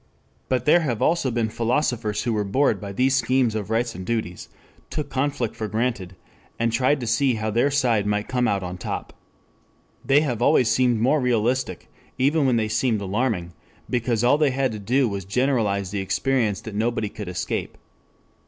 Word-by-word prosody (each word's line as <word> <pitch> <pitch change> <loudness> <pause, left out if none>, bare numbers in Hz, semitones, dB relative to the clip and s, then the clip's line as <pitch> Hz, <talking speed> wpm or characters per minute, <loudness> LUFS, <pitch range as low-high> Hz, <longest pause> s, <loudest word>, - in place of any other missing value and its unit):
But 125 -2 0
there 165 +4 +6
have 130 -9 -2
also 165 -5 +2
been 115 -2 -1
philosophers 115 -2 -1
who 120 - 0
were 105 -1 0
bored 105 -1 +1
by 100 - -6
these 130 +6 +2
schemes 125 -1 +2
of 110 -2 -4
rights 115 +1 0
and 95 - -7
duties, 110 -4 -3 0.4
took 150 - -4
conflict 130 -4 -1
for 110 - -4
granted, 110 -5 -2 0.4
and 115 0 0
tried 130 +4 +2
to - - -3
see 120 +3 +2
how 110 0 -2
their 120 +6 +2
side 120 -7 +1
might 105 0 -1
come 125 -1 0
out 100 -4 0
on 90 0 -6
top. - - -5 0.9
They 140 +2 +4
have 125 -7 -2
always 125 -3 +4
seemed 125 -3 +2
more 135 +6 +2
realistic, 120 -4 0 0.3
even 140 +2 +2
when 125 - +3
they 110 -2 +1
seemed 110 +1 0
alarming, 100 -3 -2 0.4
because 120 -2 0
all 135 +5 +4
they 150 -2 +4
had 130 -1 0
to 110 - -6
do 125 +6 +1
was 100 -2 -4
to 95 - -20
generalize 105 -6 0
the 100 - -2
experience 105 +2 0
that 110 - -8
nobody 110 +1 -1
could 105 -1 -8
escape. 90 0 -4
115 Hz, 190 wpm, -23 LUFS, 105-130 Hz, 0.9 s, there